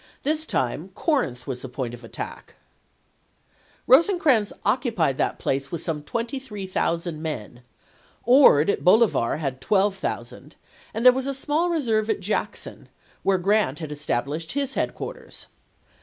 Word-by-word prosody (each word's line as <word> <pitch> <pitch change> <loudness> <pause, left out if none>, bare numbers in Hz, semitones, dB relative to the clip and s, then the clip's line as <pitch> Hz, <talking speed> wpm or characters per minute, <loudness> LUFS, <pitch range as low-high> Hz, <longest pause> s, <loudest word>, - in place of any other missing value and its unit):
This 310 +2 0
time - - -1
Corinth 245 - 0
was 125 -2 -5
the 130 - -7
point 125 -1 -4
of 120 0 -10
attack. 115 - -8 1.3
Rosecrans 285 - +4
occupied 210 - +1
that - - 0
place 135 0 -2
with 170 -1 -4
some 160 -3 -2
23,000 190 - -3
men, 125 -6 -5 0.6
Ord 230 - +6
at - - -4
Bolivar 195 - +4
had 135 -4 -4
12,000, 195 +2 -1 0.4
and 225 +2 -2
there 250 - +9
was 265 +1 -2
a 275 - -1
small 305 +6 0
reserve 225 -10 0
at 220 - +1
Jackson, 195 +3 -4 0.3
where 195 -1 +2
Grant 195 -6 +1
had 155 -3 -6
established 150 +2 -3
his 275 -1 -1
headquarters. - - -5
195 Hz, 130 wpm, -24 LUFS, -, 1.3 s, there